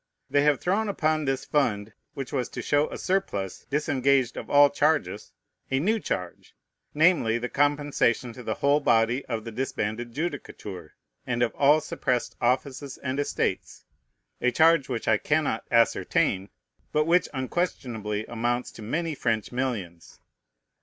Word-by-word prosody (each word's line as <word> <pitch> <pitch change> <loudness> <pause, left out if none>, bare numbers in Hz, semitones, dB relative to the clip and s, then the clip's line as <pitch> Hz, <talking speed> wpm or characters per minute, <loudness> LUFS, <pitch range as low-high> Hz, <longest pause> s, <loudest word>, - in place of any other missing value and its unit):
They 145 - +4
have 145 -1 +3
thrown 205 +4 0
upon 155 -5 0
this 135 -1 -1
fund, 105 -7 0 0.2
which 135 -3 -6
was 125 - -1
to - - -6
show 145 +1 +2
a - - -6
surplus 140 - -2
disengaged 140 -3 +1
of - - -7
all 145 0 +6
charges, 150 +2 0 0.4
a 135 - +1
new 215 +9 +1
charge, 90 - -5 0.4
namely, 150 -8 +4
the 125 +1 -4
compensation 145 -4 +1
to 125 - -10
the 110 -3 -3
whole 140 +1 +3
body 120 -1 +2
of 115 -3 -3
the 115 - -5
disbanded 120 -1 -3
judicature, 115 - -6 0.3
and 120 -1 +1
of 120 - 0
all 145 +2 +4
suppressed 125 -5 -2
offices 130 +2 -1
and 135 +1 -3
estates: 145 - -2 0.6
a 125 - +3
charge 160 0 +4
which 120 -3 -3
I 110 - +4
cannot 150 -7 0
ascertain, 105 -4 +2 0.4
but 150 0 +2
which 175 +2 +3
unquestionably 125 - -3
amounts 120 +1 -2
to - - -12
many 160 +9 -2
French 110 -6 -1
millions. 110 -10 -4
130 Hz, 145 wpm, -26 LUFS, 115-150 Hz, 0.6 s, all